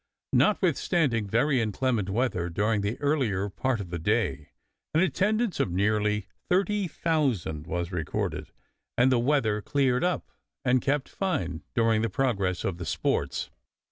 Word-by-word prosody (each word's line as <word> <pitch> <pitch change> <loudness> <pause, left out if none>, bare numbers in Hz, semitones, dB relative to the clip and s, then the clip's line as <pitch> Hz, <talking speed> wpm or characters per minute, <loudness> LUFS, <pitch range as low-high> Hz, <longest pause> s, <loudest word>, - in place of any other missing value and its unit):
Notwithstanding 165 - +2
very 125 +5 +2
inclement 110 -1 0
weather 100 -5 0
during 105 +4 +1
the 100 +3 -2
earlier 125 -10 0
part 125 +4 -1
of 90 -4 -6
the 85 - -3
day, 80 - 0 0.5
an - - +5
attendance 210 +2 +1
of - - +1
nearly 105 +2 +1 0.2
30,000 160 - 0
was 85 0 -2
recorded, 85 -4 -3 0.5
and 130 +2 +5
the 125 - +3
weather 120 -5 +1
cleared 130 +2 +1
up 180 -1 -1 0.3
and 125 0 +3
kept 140 0 0
fine 110 - -2
during 115 -2 +3
the 115 - 0
progress 100 -6 0
of 90 -2 -2
the 85 - -4
sports. - - -1
115 Hz, 140 wpm, -27 LUFS, 95-145 Hz, 0.5 s, an